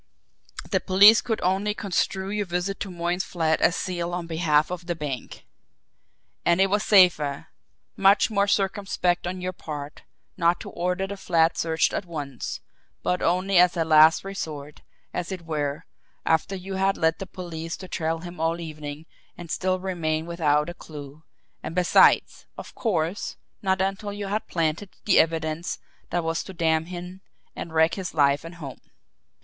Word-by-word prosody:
"The - - +3
police 205 +4 +7
could 225 -3 -2
only 195 +3 +1
construe 190 -1 -1
your 205 -1 -2
visit 180 +3 -2
to 200 - -4
Moyne's 175 +1 -1
flat 160 -2 0
as 170 - +3
zeal 175 -1 -3
on 175 -1 -4
behalf 160 -2 +1
of 180 -1 -6
the 175 - -1
bank. 145 -5 -6 1.0
And 170 +1 +3
it 195 0 +3
was 205 0 +2
safer, 175 -9 +4 0.5
much 195 +3 +4
more 200 -1 +2
circumspect 195 -3 0
on 180 +1 -4
your 185 0 -3
part, 150 -3 -7 0.4
not 170 0 +2
to - - -8
order 180 +2 -1
the 200 +1 -6
flat 165 -3 +2
searched 160 -1 +1
at 185 - -3
once, 145 -6 -5 0.4
but 180 - 0
only 185 +2 +2
as 180 0 +5
a 165 - +1
last 155 +1 +6
resort, 155 -7 -6 0.3
as 180 +1 -3
it 185 -3 -5
were, 150 -1 -3 0.4
after 160 +4 +1
you 190 +1 -5
had 195 +1 +1
led 160 0 +1
the 195 - -6
police 165 -3 -6
to 185 - -9
trail 165 -2 -2
him 175 -1 -9
all 165 +1 0
evening 155 -2 -7 0.3
and 170 -2 -8
still 185 0 0
remain 165 -4 -2
without 150 -3 +1
a 175 - -5
clew 150 -2 -10 0.4
and 165 - -6
besides, 180 -1 +4
of - - -9
course, 180 -4 -2 0.2
not 190 -1 +1
until 195 +2 -2
you 205 0 -5
had 205 +2 -2
planted 165 +3 -1 0.2
the 200 - +5
evidence 160 +1 0 0.3
that 175 -1 -1
was 165 0 -1
to 190 - -9
damn 160 -2 +1
him 180 +1 -8 0.3
and 170 - -6
wreck 160 +1 +3
his 190 -4 -5
life 140 -1 +3
and 165 +1 -9
home! 145 -6 -9
175 Hz, 170 wpm, -25 LUFS, 160-190 Hz, 1.0 s, police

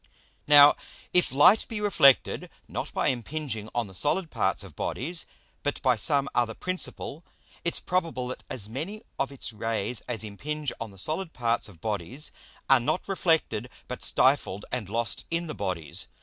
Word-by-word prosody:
Now 145 0 +9 0.4
if 180 - +4
Light 145 +11 +6
be 225 - -4
reflected, 165 -10 +4 0.2
not - - -4
by - - +1
impinging 125 -3 -3
on 120 -1 +1
the 95 - -12
solid 155 - 0
parts - - 0
of - - -12
Bodies, 165 +7 -3 0.3
but 145 - -2
by 130 -2 +4
some 140 +4 +3
other 115 -2 +1
principle; 180 -3 -4 0.4
it's 170 - 0
probable 165 -9 -1
that 125 - -6
as 105 -5 -4
many 160 - -5 0.2
of 140 - 0
its 130 -4 -4
Rays 115 +1 -2
as 120 -3 0
impinge 145 +8 -3
on 115 - -5
the 100 - -16
solid 160 - -1
parts 115 -2 0
of 85 -5 -16
Bodies 110 - -3 0.4
are 135 -1 +6
not 120 +9 -1
reflected 160 - +1 0.2
but 125 - -6
stifled 130 -7 +2
and 120 -6 -3
lost 115 +2 -1
in 170 +1 0
the 155 - -4
Bodies. 85 -7 -3
130 Hz, 165 wpm, -27 LUFS, 115-155 Hz, 0.4 s, Now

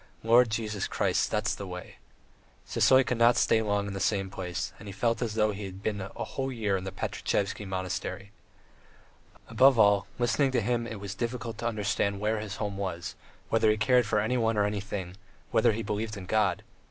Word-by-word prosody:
Lord 120 +1 +5
Jesus 105 -2 -2
Christ.... - - +1
That's - - 0
the 100 - -6
way... 90 0 -8 0.3
." - - -33
Sisoy 130 0 +4
could 125 - -1
never 120 +1 +5
stay 110 - +3
long 105 -2 0
in 100 - -5
the 100 - -4
same 95 -2 0
place, 90 -2 -4
and 105 - -11
he - - -5
felt 115 +4 0
as 115 -3 -2
though 110 -1 +2
he 100 0 -6
had 95 +1 -9
been 105 -2 -1
a 95 - -4 0.2
whole 135 0 -3
year 110 -5 0
in 95 0 -3
the 95 - -4
Pankratievsky 100 +1 -2
Monastery. 95 +1 -4 1.2
Above 130 0 +5
all, 100 -2 +4
listening 120 +3 +2
to 120 - +2
him 120 +2 0
it 110 -3 -6
was 100 -1 -5
difficult 115 0 -4
to 120 - -1
understand 100 -2 -1
where 105 +1 0
his 105 -1 -5
home 105 -3 -3
was, 95 -3 -4 0.4
whether 110 -1 +3
he 105 - +3
cared 125 +1 +3
for 105 - +2
anyone 115 0 +1
or 105 - +3
anything, 100 -3 -4 0.3
whether - - +4
he 110 +1 -3
believed 105 +1 -3
in 95 - -7
God. 100 -3 +1
105 Hz, 200 wpm, -28 LUFS, 100-115 Hz, 1.2 s, Lord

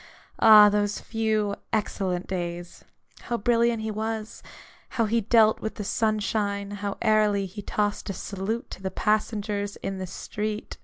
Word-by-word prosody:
Ah, 215 -1 +9
those 205 0 0
few 215 -2 -1 0.2
excellent 185 -4 -1
days! 175 -1 -5 0.4
How 240 - -1
brilliant 235 0 +2
he 220 - -2
was; 220 +1 -4 0.6
how 230 - +3
he 230 +2 +1
dealt 220 0 +4
with 220 - -4
the 210 - -5
sunshine; 205 -1 -1
how 205 -1 -4
airily 210 -2 +3
he 195 +3 -8
tossed 205 +1 -2
a - - -1
salute 200 +5 -4
to 185 - -8
the 190 - -2
passengers 210 -1 -1
in 195 -1 -3
the 185 - -4
street 210 +4 -5
210 Hz, 150 wpm, -26 LUFS, 200-220 Hz, 0.6 s, Ah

